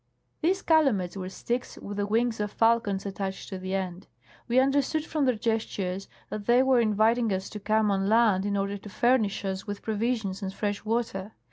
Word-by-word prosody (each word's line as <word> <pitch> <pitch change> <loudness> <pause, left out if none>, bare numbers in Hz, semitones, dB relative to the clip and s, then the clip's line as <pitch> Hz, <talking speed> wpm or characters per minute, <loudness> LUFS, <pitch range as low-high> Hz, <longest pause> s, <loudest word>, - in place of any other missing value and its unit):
These 370 +4 +1
calumets 265 - +3
were 185 -1 -5
sticks 240 +5 -4
with 205 0 -7
the 205 0 0
wings 230 +1 +1
of 210 -1 -2
falcons 225 -4 +2
attached 195 -1 -4
to 190 - -5
the 185 +1 -3
end. 185 -1 -4 0.4
We 240 - +1
understood 280 +3 +2
from 305 -3 0
their 255 -2 +2
gestures 205 -4 -2 0.2
that 210 -1 -5
they 245 +2 +5
were 265 -2 +4
inviting 225 +1 +3
us 190 0 -2
to 210 - -6
come 215 +1 +2
on 195 0 +1
land 220 -4 +4
in 200 0 -1
order 200 +1 -2
to 205 - -10
furnish 220 -2 +1
us 190 +1 -3
with 205 0 -5
provisions 220 -2 -1
and 190 -1 -3
fresh 205 +1 -3
water. 220 -3 -2
210 Hz, 195 wpm, -27 LUFS, 195-235 Hz, 0.4 s, they